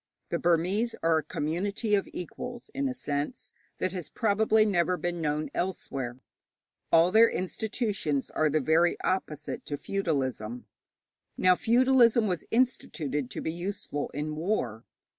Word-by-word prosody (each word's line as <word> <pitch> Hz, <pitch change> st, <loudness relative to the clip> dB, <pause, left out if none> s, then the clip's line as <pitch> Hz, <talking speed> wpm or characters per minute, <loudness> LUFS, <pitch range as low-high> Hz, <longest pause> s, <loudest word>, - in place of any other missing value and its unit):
The -, -, -1 dB
Burmese 180 Hz, +7 st, +1 dB
are 165 Hz, -1 st, +4 dB
a -, -, -6 dB
community 190 Hz, -, -2 dB
of 200 Hz, -1 st, +2 dB
equals, 240 Hz, +7 st, -7 dB
in 275 Hz, 0 st, 0 dB
a -, -, -2 dB
sense 145 Hz, -, -4 dB, 0.2 s
that 185 Hz, -, -1 dB
has 180 Hz, -3 st, -6 dB
probably 220 Hz, 0 st, +3 dB
never 180 Hz, -3 st, +2 dB
been 175 Hz, +1 st, -3 dB
known 150 Hz, 0 st, -1 dB
elsewhere. 135 Hz, -9 st, -3 dB, 0.7 s
All 165 Hz, +2 st, +6 dB
their 225 Hz, +3 st, +7 dB
institutions 195 Hz, -, -2 dB
are 155 Hz, -1 st, +2 dB
the 155 Hz, +1 st, +1 dB
very 160 Hz, +5 st, +3 dB
opposite 150 Hz, -6 st, -2 dB
to 145 Hz, -, -3 dB
feudalism. 130 Hz, -, -2 dB, 0.7 s
Now, 185 Hz, 0 st, +5 dB
feudalism 235 Hz, +1 st, +4 dB
was 180 Hz, -5 st, -2 dB
instituted 150 Hz, -, 0 dB
to -, -, -5 dB
be 160 Hz, -, -2 dB
useful 175 Hz, -4 st, -4 dB
in 150 Hz, +2 st, -4 dB
war. 150 Hz, -, -2 dB
175 Hz, 140 wpm, -28 LUFS, 150-215 Hz, 0.7 s, their